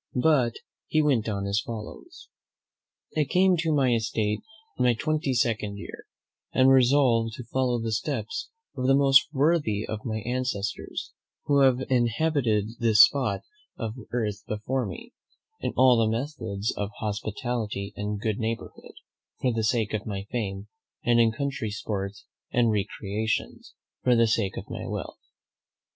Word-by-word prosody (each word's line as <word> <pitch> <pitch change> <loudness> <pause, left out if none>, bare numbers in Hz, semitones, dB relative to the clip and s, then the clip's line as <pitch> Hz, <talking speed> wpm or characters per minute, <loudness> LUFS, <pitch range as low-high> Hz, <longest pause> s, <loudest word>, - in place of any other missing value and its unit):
But 125 -3 +3 0.3
he 155 -1 +2
went 125 -7 +2
on 100 -2 -2
as 100 +2 +1
follows: 120 - -8 0.9
"I 155 - +3
came 185 +6 +3
to 165 -1 0
my 135 -5 +3
estate 110 -2 0 0.4
in - - +3
my 125 -1 +4
twenty 150 +1 -1
second 110 -4 0
year, - - -9 0.5
and 130 +1 +5
resolved 125 -4 +4
to 125 - -7
follow 125 0 0
the 115 0 -3
steps 155 - -3 0.3
of 130 -1 -1
the 135 - +5
most 135 -1 +5
worthy 145 -8 +1
of 110 -1 -5
my 110 -2 -3
ancestors 120 -4 -3 0.3
who 140 -1 +3
have 130 -2 +4
inhabited 120 -3 +1
this 115 -1 +7
spot 135 +2 -1 0.4
of 115 -2 -3 0.2
earth 105 -4 -2
before 120 +5 -2
me, 235 +1 -9 0.5
in - - -2
all 130 -1 +6
the 110 -1 +3
methods 115 -5 -3
of 100 -1 -2
hospitality 105 -1 -3
and 105 0 -3
good 110 -2 -1
neighbourhood, 115 0 -5 0.5
for 125 -2 +1
the 115 -1 -1
sake 110 -1 +1
of 110 0 -3
my 100 -2 -3
fame; 100 -4 -3 0.4
and 120 0 +4
in 115 -1 +5
country 135 -2 -3
sports 100 -2 -4 0.2
and 120 -2 +2
recreations, 105 - -3 0.3
for 125 -1 +4
the 115 0 +5
sake 110 -3 0
of - - -6
my - - -6
health. - - -5
115 Hz, 150 wpm, -26 LUFS, 105-130 Hz, 0.9 s, this